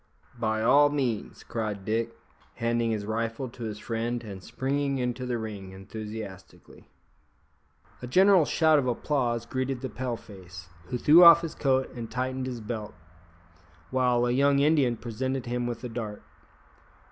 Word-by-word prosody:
"By 110 -1 0
all 145 +5 +6
means," 130 -7 -2
cried 105 -4 -4
Dick, 115 +1 -1 0.4
handing 115 0 0
his 105 -2 -2
rifle 115 +4 -3
to 120 0 -10
his 105 -1 -5
friend, 115 +2 -3
and 100 -4 -8
springing 140 +3 -1
into 125 0 -2
the 120 -1 -1
ring 100 -4 -7
enthusiastically. 105 0 -9 1.1
A 125 - -6
general 185 +4 +5
shout 155 0 +4
of 130 - -1
applause 120 -2 -1
greeted 130 +1 -3
the 130 - -4
Pale 125 -2 -3
face, 90 -4 -12 0.2
who 125 - -2
threw 155 +8 +7
off' 170 0 +10
his 165 - -4
coat 130 -2 0
and 115 -2 -6
tightened 130 +1 -3
his 125 -3 -5
belt, 105 -1 -5 1.0
while, 125 -2 +2
a 120 - +1
young 140 +2 +3
Indian 140 -5 +3
presented 130 +3 -3
him 120 0 -2
with 120 0 -5
a 125 - -4
dart. 110 -3 -6
120 Hz, 155 wpm, -27 LUFS, 110-130 Hz, 1.1 s, off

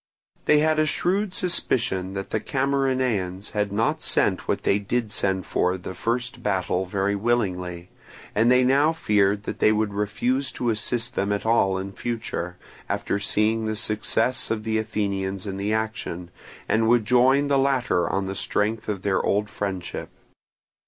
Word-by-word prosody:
They 150 - +5
had 155 0 +2
a 155 - +3
shrewd 185 +5 0
suspicion 115 - 0
that 95 0 -5
the 110 - +1
Camarinaeans 130 -9 -1
had 105 -1 -1
not 110 +3 0
sent - - +2
what - - -1
they 100 - +2
did 110 +2 -2
send 95 -3 0
for 90 +1 0
the 95 0 -7
first 120 +6 -2
battle 95 -2 0
very 100 +1 0
willingly; 90 -6 -1 0.4
and 110 +3 +3
they 125 0 +5
now 140 +5 +4
feared 105 -8 +2
that - - -5
they 110 - +5
would 110 -1 0
refuse 115 +7 0
to 120 -2 0
assist 115 +2 -1
them 100 -2 -1
at 100 +1 -1
all 100 -4 +3
in 95 +1 -5
future, 105 -6 -4 0.3
after 100 - -1
seeing 110 +2 +1
the 110 0 -1
success 110 +4 0
of 110 -1 -2
the 110 0 0
Athenians 100 -3 -2
in 95 -1 -4
the 100 +2 -1
action, 110 -6 -3 0.4
and 110 0 +2
would 120 -2 +4
join 130 +4 +4
the 140 -1 +3
latter 130 -9 +1
on 95 0 -1
the 95 - -3
strength 110 +2 -1
of 100 -3 -3
their 100 -2 +1
old 105 +1 0
friendship. 95 -3 -4
110 Hz, 165 wpm, -24 LUFS, 100-120 Hz, 0.4 s, They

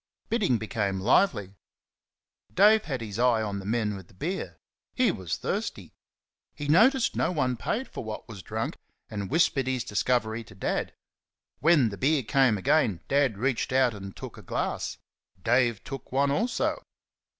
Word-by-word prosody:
Bidding 205 - +2
became 100 -2 -2
lively. 105 - +2 1.0
Dave 215 - +5
had 135 -6 -3
his 110 -1 -5
eye 120 -3 +3
on 100 -2 -3
the 95 - -8
men 110 -2 0
with 95 -3 -10
the 95 - -22
beer 175 - -4 0.4
he 255 -2 +3
was 95 -4 -4
thirsty. - - -4 0.6
He 145 - -5
noticed 235 - +4
no - - +1
one 130 -7 0
paid 235 - -2
for - - -7
what 110 +2 -6
was 105 -5 -9
drunk, - - -4 0.3
and 100 -3 -4
whispered 145 -5 +2
his 130 -2 0
discovery 110 +1 0
to 95 - -15
Dad. 95 - -2 0.6
When 150 -7 +4
the 100 - -7
beer 140 0 +2
came 130 -2 +3
again, 125 - +2
Dad 140 -6 +2
reached 130 +4 -1
out 130 -2 +3
and 100 -2 -8
took - - -9
a - - -10
glass. - - -3 0.5
Dave 120 -2 +2
took 135 -3 -8
one 140 +2 +2
also. 230 - 0
125 Hz, 160 wpm, -27 LUFS, 105-145 Hz, 1.0 s, Dave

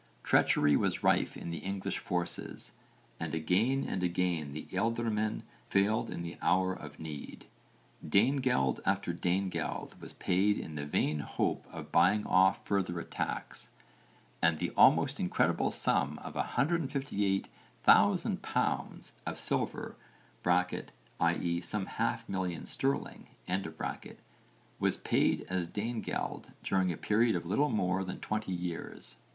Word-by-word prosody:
Treachery 75 -1 +4
was - - 0
rife - - +2
in 85 - -6
the 85 - -4
English 95 0 -3
forces 90 -1 -3 0.5
and 80 -1 -3
again 105 +12 +2
and 95 - -2
again 85 -4 0
the 75 +2 -6
ealdormen 110 +1 0 0.3
failed 100 +3 +2
in 85 - -4
the 85 0 -7
hour 95 0 +3
of 75 -5 -10
need. 75 -2 -7 0.6
Danegeld 115 - +2
after 95 -2 0
Danegeld 90 +2 -2
was - - -8
paid 100 +3 +2
in 80 - -6
the 75 -1 -4
vain 75 +1 +1
hope - - -1
of 80 -2 -8
buying 95 +5 +4
off 95 +1 +4
further 95 -3 0
attacks, - - -4 0.7
and 80 -1 +3
the - - -2
almost - - +5
incredible 90 - +2
sum - - +1
of - - -7
158,000 135 - +1
pounds - - -2
of - - -3
silver - - -2 0.5
(i.e. 90 -1 0
some 95 +2 -2
half - - -2
million 95 -4 -3
sterling) 135 +1 -2 1.5
was - - +2
paid - - +1
as 90 -2 -1
Danegeld 110 +5 -3 0.2
during 95 -2 +2
a 80 - -4
period 110 +1 +2
of 85 - -2
little 140 - +2
more 95 -2 +1
than 95 0 -5
20 110 -2 -3
years. 90 -2 -5
95 Hz, 125 wpm, -32 LUFS, 85-105 Hz, 1.5 s, almost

